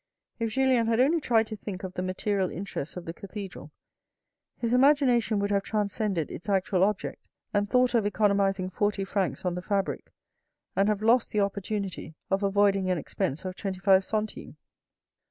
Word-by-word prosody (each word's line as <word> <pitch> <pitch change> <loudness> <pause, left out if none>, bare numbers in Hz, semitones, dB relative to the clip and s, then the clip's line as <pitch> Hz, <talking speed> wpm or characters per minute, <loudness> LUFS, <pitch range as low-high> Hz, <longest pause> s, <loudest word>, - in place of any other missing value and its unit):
If 230 -1 0
Julien 260 -3 +3
had 230 0 +2
only 305 +6 +3
tried 225 -5 +3
to 215 - -6
think 200 -2 -7
of 185 -1 -5
the 180 - -3
material 185 +1 -1
interests 180 -3 -5
of 180 - -7
the 165 - -5
cathedral, 195 -5 -8 0.9
his 235 0 -1
imagination 250 -5 +4
would 200 0 0
have 200 -1 +2
transcended 200 -5 -1
its 180 - -7
actual 190 -1 +2
object 205 0 -2 0.3
and 205 0 +1
thought 250 +1 +3
of 225 -4 +3
economizing 200 -3 +1
forty 205 +1 0
francs 195 -1 -2
on 180 - +1
the 180 - -4
fabric 195 +1 -2 0.6
and 200 +2 +3
have 210 0 -1
lost 235 +2 +4
the 210 - +1
opportunity 200 -4 -3 0.2
of 195 +1 +2
avoiding 200 -1 +2
an 180 - +1
expense 145 0 -3
of 185 0 -4
twenty 190 -1 -4
five 190 0 +5
centimes. 215 +1 -4
200 Hz, 175 wpm, -27 LUFS, 190-220 Hz, 0.9 s, five